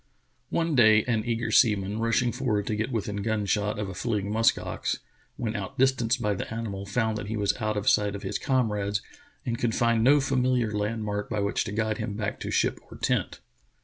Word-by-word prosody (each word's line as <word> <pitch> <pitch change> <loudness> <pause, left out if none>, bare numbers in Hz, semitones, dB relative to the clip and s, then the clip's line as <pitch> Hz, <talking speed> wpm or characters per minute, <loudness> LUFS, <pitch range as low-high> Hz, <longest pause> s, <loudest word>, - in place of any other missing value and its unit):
One 165 -1 0
day 110 -4 +6
an 115 -3 0
eager 115 -1 -1
seaman, 105 -3 +3
rushing 115 +1 +2
forward 115 -6 -1
to 110 - -1
get 110 +4 -2
within 105 -3 -2
gun 105 0 -1
shot 105 +1 0
of 105 -1 -2
a 95 - -6
fleeting 105 0 -2
musk 115 +1 +3
ox, - - -3 0.4
when 115 -3 -2
outdis 125 +6 +1
tanced 120 +1 0
by 105 -3 0
the 100 - -5
animal 105 -4 -4
found 110 +1 0
that 105 - -6
he 110 +1 -3
was 100 -1 +1
out 110 0 0
of 105 - -3
sight 105 -1 +3
of 100 - -7
his 95 +1 -2
comrades 105 -6 0 0.4
and 115 -1 -2
could 115 -2 0
find 115 -1 +2
no 145 +4 +6
familiar 130 -4 +1
landmark 105 0 -2
by 110 - -1
which 100 0 0
to - - -4
guide 110 0 -1
him 105 - -3
back 105 -2 -3
to - - -5
ship - - +1
or - - -10
tent. - - -1
110 Hz, 210 wpm, -27 LUFS, 105-115 Hz, 0.4 s, day